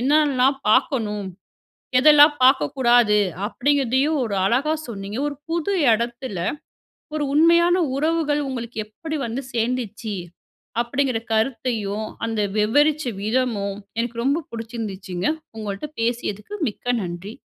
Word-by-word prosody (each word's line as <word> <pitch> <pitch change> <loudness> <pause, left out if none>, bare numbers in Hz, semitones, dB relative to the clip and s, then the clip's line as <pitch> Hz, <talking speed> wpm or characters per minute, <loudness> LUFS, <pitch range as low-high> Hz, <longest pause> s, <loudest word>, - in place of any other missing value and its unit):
என்னலாம் 275 -1 +3
பார்க்கணும்? 215 -5 +1 0.7
எதெல்லாம் 295 +1 +7
பார்க்கக்கூடாது? 245 -5 +4 0.3
அப்பிடிங்கிறதையும் 275 +4 +1
ஒரு 205 -3 -3
அழகா 270 +10 +2
சொன்னீங்க. 205 +1 -6
ஒரு 285 - -6
புது 340 +4 0 0.2
இடத்தில 235 -1 -2 0.8
ஒரு 300 - -1
உண்மையான 340 +3 +5 0.2
உறவுகள் 305 -1 +1
உங்களுக்கு 235 -3 -6
எப்பிடி 310 +9 -6
வந்து 240 +4 -4
சேர்ந்துச்சு? 230 -3 -2 0.7
அப்பிடிங்கிற 250 0 0
கருத்தையும், 220 -3 -1 0.2
அந்த 225 -2 -1 0.2
விவரிச்ச 290 +8 +3 0.2
விதமும் 215 -3 -1 0.2
எனக்கு 235 0 -2
ரொம்ப 295 +4 +1
பிடிச்சிருந்துச்சுங்க. 210 -6 -4 0.3
உங்கள்ட்ட 210 +6 -5
பேசியதுக்கு 230 - -2
மிக்க 210 - -15 0.2
நன்றி. 175 +5 -6
245 Hz, 105 wpm, -22 LUFS, 215-290 Hz, 0.8 s, எதெல்லாம்